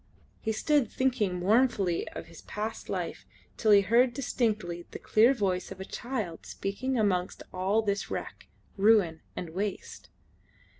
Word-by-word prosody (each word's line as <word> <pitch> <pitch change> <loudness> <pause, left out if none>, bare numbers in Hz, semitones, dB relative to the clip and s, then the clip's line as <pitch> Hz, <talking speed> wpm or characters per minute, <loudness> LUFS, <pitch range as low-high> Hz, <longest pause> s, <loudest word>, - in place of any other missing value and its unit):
He 220 - -1
stood 275 +1 +2
thinking 240 -8 0
mournfully 200 -2 +2
of - - -7
his 165 0 -13
past 215 +2 -5
life - - -3 0.3
till 220 - 0
he 205 -1 +8
heard 235 +4 +3
distinctly 215 -10 -1
the - - -7
clear 225 +4 +4
voice 195 -7 -1
of - - -8
a 190 - -5
child 220 -8 -4
speaking 250 +7 -2
amongst 185 -4 0
all 195 +4 +1
this 200 -1 -1
wreck, - - -6 0.3
ruin, 195 -6 +4
and 170 -3 -5
waste. 195 +4 -4
210 Hz, 145 wpm, -29 LUFS, 185-235 Hz, 0.3 s, he